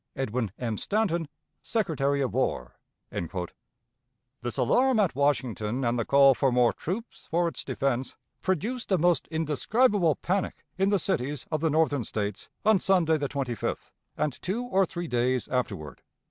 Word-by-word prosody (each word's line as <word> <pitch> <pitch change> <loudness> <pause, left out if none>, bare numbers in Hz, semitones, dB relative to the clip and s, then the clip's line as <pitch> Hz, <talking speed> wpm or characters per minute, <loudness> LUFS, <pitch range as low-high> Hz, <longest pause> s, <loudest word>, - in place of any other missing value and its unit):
"EDWIN 125 -5 -2
M. 115 -4 -3
STANTON, 190 -7 0 0.3
Secretary 140 - 0
of 130 - -1
War." 60 - -1 1.6
This 120 0 -4
alarm 245 - +3
at 195 -5 +2
Washington, 130 -4 0
and 120 +1 +1
the 115 - 0
call 140 -1 +6
for 135 +1 +1
more 125 -1 +4
troops 210 +8 -6
for 170 +1 +2
its 165 - -4
defense, 130 -1 -1 0.3
produced 210 - -2
a 190 - +5
most 175 +1 +2
indescribable 165 - +2
panic 190 +1 -2
in 195 +1 +2
the 200 - +3
cities 150 -6 -2
of 155 -2 0
the 160 - +2
Northern 150 -4 +2
States 105 -2 -4 0.2
on 215 -2 +5
Sunday 175 -5 +3
the 145 -2 -2
25th, 130 -6 -3 0.3
and 150 -4 -2
two 205 +7 -2
or 195 -6 +2
three 175 +1 -5
days 125 -1 0
afterward. 80 - -3
145 Hz, 150 wpm, -27 LUFS, 125-185 Hz, 1.6 s, call